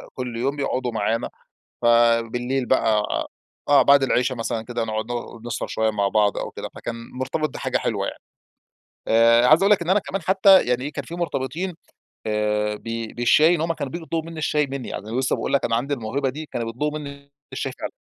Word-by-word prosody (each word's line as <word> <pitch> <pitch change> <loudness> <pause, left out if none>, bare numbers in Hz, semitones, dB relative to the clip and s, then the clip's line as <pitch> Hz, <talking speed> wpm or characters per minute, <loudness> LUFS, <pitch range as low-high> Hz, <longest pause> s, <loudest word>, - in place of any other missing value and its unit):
كل 125 -3 -5
يوم، 135 +4 -1
بيقعدوا 130 -3 -2
معانا 110 +1 -1 0.5
ف - - -2 0.4
بالليل 125 +3 -2
بقى 110 -5 +2 0.7
آه، 145 -1 +7
بعد 140 -1 +5
العشا 130 0 +1
مثلًا 115 -1 -3
كده، 120 -2 -3
نقعد 110 0 -3
ن 120 -1 -6
نسهر 120 - -3
شوية 110 0 0
مع 100 -2 0
بعض 105 0 +2
أو - - -4
كده، - - -7
فكان 115 - -5 0.2
مُرتبط 140 +4 -2
بحاجة - - -2
حلوة - - -2
يعني. - - -7 0.9
آآ، 115 +2 +5
عايز 155 +6 +6
أقول 200 - +4
لك 195 - +5
إن 170 - -3
أنا 200 +2 +4
كمان 195 -1 -5
حتى، 190 +2 +6
يعني 125 +1 0
إيه، 150 - -4
كان - - -5
في 170 - -7
مُرتبطين 170 +2 -3 0.5
آآ، 105 0 0
ب - - -17 0.3
بالشاي 150 +8 +5
إن 160 - -1
هم 165 +1 0
كانوا 135 - -5
بييجوا 170 -2 -6
يطلبوا 165 0 -3
مني 160 - -8
الشاي، 150 -1 +1
مني. 135 -2 -6
يعني 110 +5 -4
لسه 130 - 0
باقول - - -3
لك، 140 - +2
أنا 115 - +1
عندي 140 +4 -1
الموهبة 135 +3 -2
دي، 155 +3 -7
كانوا 115 -4 -4
بيطلبوا 150 +7 -2
مني 140 -1 -10 0.2
الشاي 135 -1 -3
فعلًا. - - -3
130 Hz, 205 wpm, -23 LUFS, 115-150 Hz, 0.9 s, آه